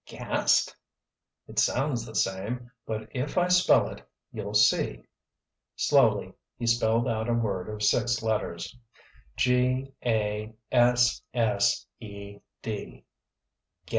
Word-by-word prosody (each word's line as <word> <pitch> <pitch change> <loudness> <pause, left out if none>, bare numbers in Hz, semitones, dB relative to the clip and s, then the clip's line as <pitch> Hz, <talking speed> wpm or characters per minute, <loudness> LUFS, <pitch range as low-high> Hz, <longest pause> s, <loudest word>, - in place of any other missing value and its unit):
"Gast?——" - - +1 0.7
"It - - -2
sounds 125 -3 0
the 110 - -10
same, 110 +6 -2 0.2
but 110 -1 -4
if 130 +6 -3
I 180 0 +3
spell 180 0 +5
it - - -10 0.3
you'll - - -5
see." - - +3 0.7
Slowly - - +3 0.2
he 120 - -4
spelled 115 0 +2
a 110 +1 -1
word 100 -5 -2
of 105 0 -5
six 120 +2 +2
letters. 105 -4 -2 0.6
"G 130 +1 +1
a 110 -1 -1 0.2
s 120 0 +4
s 115 0 +2
e 100 -2 -10 0.2
d." 110 -2 -6
115 Hz, 110 wpm, -27 LUFS, 105-125 Hz, 0.7 s, spell